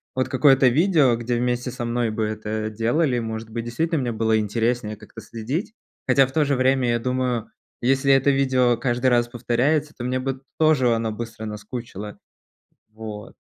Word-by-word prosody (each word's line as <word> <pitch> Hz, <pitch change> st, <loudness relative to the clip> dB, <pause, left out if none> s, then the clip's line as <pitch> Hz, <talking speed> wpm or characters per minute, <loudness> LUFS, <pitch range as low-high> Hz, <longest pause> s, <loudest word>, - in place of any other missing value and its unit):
вот 130 Hz, 0 st, 0 dB
какое-то 135 Hz, -1 st, +5 dB
видео, 150 Hz, -3 st, +3 dB
где 120 Hz, +1 st, -2 dB
вместе 125 Hz, +1 st, -1 dB
со 120 Hz, -, -6 dB
мной 120 Hz, 0 st, 0 dB
бы 110 Hz, 0 st, -2 dB
это 110 Hz, 0 st, -3 dB
делали, 120 Hz, +5 st, 0 dB
может 110 Hz, -1 st, -5 dB
быть, 115 Hz, +1 st, -5 dB
действительно 160 Hz, +7 st, -1 dB
мне 125 Hz, -3 st, -1 dB
было 110 Hz, 0 st, +1 dB
интереснее 110 Hz, +1 st, -1 dB
как-то 105 Hz, 0 st, -13 dB
следить. 130 Hz, -, -4 dB, 0.3 s
Хотя, 135 Hz, +1 st, +5 dB
в 130 Hz, -, -9 dB
то 155 Hz, +1 st, +2 dB
же 140 Hz, 0 st, +1 dB
время, 130 Hz, -1 st, +2 dB
я 120 Hz, 0 st, +1 dB
думаю, 125 Hz, -1 st, -1 dB, 0.3 s
если 135 Hz, +2 st, +3 dB
это 135 Hz, +1 st, +3 dB
видео 130 Hz, -3 st, +2 dB
каждый 120 Hz, +1 st, 0 dB
раз 120 Hz, -1 st, +3 dB
повторяется, 135 Hz, +6 st, 0 dB
то 120 Hz, -, -7 dB
мне 130 Hz, +1 st, -1 dB
бы 135 Hz, 0 st, -3 dB, 0.2 s
тоже 140 Hz, -7 st, +3 dB
она 115 Hz, -1 st, -2 dB
быстро 115 Hz, 0 st, -7 dB
наскучило. 105 Hz, -1 st, -7 dB, 0.8 s
Вот. 110 Hz, -1 st, -8 dB
120 Hz, 175 wpm, -23 LUFS, 115-135 Hz, 0.8 s, какое-то